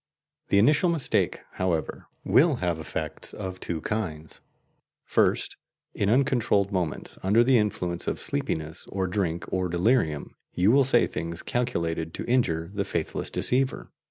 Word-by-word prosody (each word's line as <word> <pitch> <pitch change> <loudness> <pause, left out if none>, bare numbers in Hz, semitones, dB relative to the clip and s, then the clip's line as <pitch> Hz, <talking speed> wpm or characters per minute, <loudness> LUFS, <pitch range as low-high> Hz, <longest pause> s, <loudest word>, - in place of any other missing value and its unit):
The 100 - +3
initial 150 - +4
mistake, 165 -6 0
however, 90 -4 -2 0.2
will 155 +1 +4
have 90 -7 -1
effects 80 - -5
of 95 -2 -6
two 80 -2 -4
kinds. 80 -8 -4 0.6
First, - - +1 0.4
in 100 - 0
uncontrolled 120 -5 +2
moments, 90 -6 -3
under 105 +5 +4
the 125 -1 +4
influence 90 -5 -2
of - - -1
sleepiness 80 +1 -2
or 95 -1 -1
drink 90 -3 -1
or 95 -1 0
delirium, 85 - +1 0.2
you 95 +4 +3
will 135 +1 +5
say 120 -2 +4
things 85 +1 -5
calculated 85 -9 -2
to - - -5
injure 85 -9 +1
the 100 -1 -1
faithless 85 -4 -3
deceiver. 130 +1 0
95 Hz, 140 wpm, -26 LUFS, 85-120 Hz, 0.6 s, will